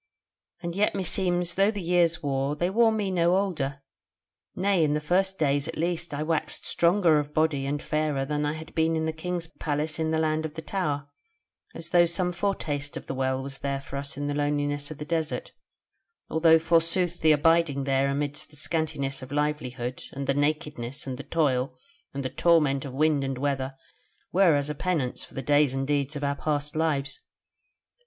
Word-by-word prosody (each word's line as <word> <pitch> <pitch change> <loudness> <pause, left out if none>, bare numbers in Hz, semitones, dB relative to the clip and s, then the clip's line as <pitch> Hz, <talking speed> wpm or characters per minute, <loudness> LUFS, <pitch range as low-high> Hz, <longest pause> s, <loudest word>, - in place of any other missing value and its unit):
And 170 0 -3
yet 205 +1 +2
meseems 180 -2 +1
though 195 +2 +3
the 210 -2 -3
years 170 -2 +2
wore, 140 0 0
they 175 +4 0
wore 225 +2 +4
me 210 -3 -1
no 175 0 +3
older; 145 -8 -2 0.7
nay, 190 -2 +2
in 150 -1 +2
the - - +1
first 190 +5 +1
days 145 -1 +1
at 165 - -6
least 170 0 -1
I 145 +1 -2
waxed 160 0 -2
stronger 170 -3 +4
of 150 0 -5
body 155 -3 +1
and 145 +1 -1
fairer 150 -3 -1
than 150 +1 -1
I 150 0 0
had 160 0 -9
been 160 0 +2
in 160 0 0
the 160 - -1
King's 175 +1 -3
Palace 155 -1 -3
in 160 0 0
the 160 - +1
Land 155 0 +1
of 155 -1 -5
the 160 - -5
Tower, 145 -7 -2 0.7
as 170 +1 -8
though 175 -1 +6
some 180 +1 0
foretaste 160 -6 -2
of - - -8
the - - -4
Well 130 0 -1
was 135 0 -7
there 140 -1 -2
for 135 0 -9
us 140 0 -5
in 145 - -3
the 145 - -1
loneliness 145 0 -1
of 155 - -7
the 150 - -6
desert; 165 - -2 0.8
although 160 0 +6
forsooth 165 +2 +2
the 155 -1 +6
abiding 155 -2 +3
there 135 0 +2
amidst 145 +1 -2
the 150 - -17
scantiness 150 -3 -2
of 130 +1 -9
livelihood, 130 -4 -2
and 140 0 -4
the 140 - +2
nakedness, 145 -3 -2
and 130 -1 -5
the - - -5
toil, 130 -5 0 0.3
and 135 -1 -5
the - - 0
torment 150 -5 +3
of 135 - -6
wind 150 0 +2
and 135 -1 -2
weather 135 -1 -1 0.6
were 180 -4 +5
as 145 0 0
a 150 - -2
penance 150 -5 -2
for - - -15
the 135 - -4
days 145 0 +3
and 135 0 -1
deeds 145 +1 0
of 145 - -4
our 140 0 +1
past 150 0 -2
lives. 145 -3 -1
150 Hz, 200 wpm, -27 LUFS, 140-170 Hz, 0.8 s, though